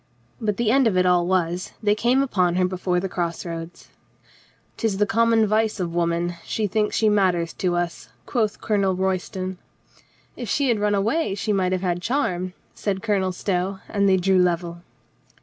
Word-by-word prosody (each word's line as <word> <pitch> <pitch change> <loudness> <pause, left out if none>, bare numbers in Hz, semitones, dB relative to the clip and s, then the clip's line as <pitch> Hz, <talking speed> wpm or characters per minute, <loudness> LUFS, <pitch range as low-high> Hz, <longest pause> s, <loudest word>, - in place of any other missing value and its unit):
But 210 -3 -1
the 235 -2 +2
end 265 -1 +4
of 195 -4 +1
it 185 - +3
all 175 -1 +3
was, 180 -1 -1
they 205 -1 +4
came 245 +5 +2
upon 180 -9 +1
her 185 0 +3
before 180 -1 -1
the 195 - -2
cross 170 -2 -3
roads. 165 0 -7 0.4
" - - -32
'Tis 220 -4 0
the 210 - +3
common 230 +1 +3
vice 215 0 +1
of 170 -2 -2
woman. 170 0 0
She 220 - -2
thinks 210 +1 0
she 220 - +3
matters 185 -5 +2
to 180 -2 +1
us," 170 -11 -3 0.2
quoth 215 -4 -1
Colonel 200 -3 +1
Royston. 185 0 -2 0.8
"If 240 -4 -6
she 275 +4 +1
had 230 -3 +2
run 205 0 +2
away 215 +4 0
she 210 +1 -1
might 185 -2 +1
have 185 -1 0
had 175 -1 -1
charm," 185 -8 -1 0.2
said 195 -2 -3
Colonel 195 -4 +1
Stow, 185 +1 -2
and 200 -1 +1
they 190 - +4
drew 190 +1 +3
level. 170 -1 0
190 Hz, 185 wpm, -23 LUFS, 180-210 Hz, 0.8 s, end